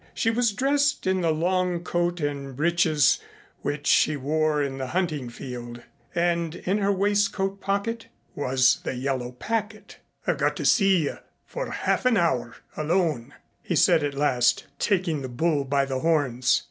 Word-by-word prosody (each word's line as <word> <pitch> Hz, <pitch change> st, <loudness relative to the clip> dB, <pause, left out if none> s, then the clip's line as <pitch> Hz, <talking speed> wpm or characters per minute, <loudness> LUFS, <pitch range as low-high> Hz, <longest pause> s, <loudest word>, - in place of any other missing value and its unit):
She 225 Hz, -, +1 dB
was 235 Hz, 0 st, +2 dB
dressed 275 Hz, +5 st, +1 dB
in 190 Hz, 0 st, +1 dB
the 170 Hz, -, +1 dB
long 175 Hz, +2 st, 0 dB
coat 175 Hz, 0 st, -1 dB
and 140 Hz, -2 st, -3 dB
breeches 160 Hz, -2 st, +3 dB, 0.4 s
which 145 Hz, 0 st, -3 dB
she 155 Hz, -1 st, +3 dB
wore 155 Hz, +2 st, 0 dB
in 135 Hz, -1 st, -4 dB
the 130 Hz, -, -3 dB
hunting 155 Hz, -5 st, -2 dB
field, 120 Hz, -1 st, -8 dB, 0.3 s
and 170 Hz, -1 st, 0 dB
in 190 Hz, +3 st, -1 dB
her 200 Hz, 0 st, +2 dB
waistcoat 200 Hz, 0 st, 0 dB
pocket 225 Hz, +4 st, -2 dB, 0.3 s
was 130 Hz, -2 st, +2 dB
the -, -, -3 dB
yellow 125 Hz, -1 st, -3 dB
packet. 215 Hz, -, -4 dB, 0.3 s
"I've -, -, 0 dB
got -, -, +1 dB
to -, -, -4 dB
see 195 Hz, -5 st, +4 dB
you 145 Hz, -, -3 dB, 0.3 s
for -, -, -5 dB
half 255 Hz, -, 0 dB
an 240 Hz, -3 st, +3 dB
hour 125 Hz, -9 st, 0 dB, 0.2 s
alone," 155 Hz, -6 st, -1 dB, 0.3 s
he -, -, -2 dB
said 160 Hz, -, +4 dB
at 145 Hz, -1 st, -2 dB
last, 125 Hz, -4 st, +2 dB
taking 175 Hz, -7 st, 0 dB
the 130 Hz, -, -5 dB
bull 145 Hz, +3 st, 0 dB
by 140 Hz, 0 st, +1 dB
the 135 Hz, -1 st, -3 dB
horns. 135 Hz, -6 st, +2 dB
160 Hz, 160 wpm, -25 LUFS, 135-195 Hz, 0.4 s, see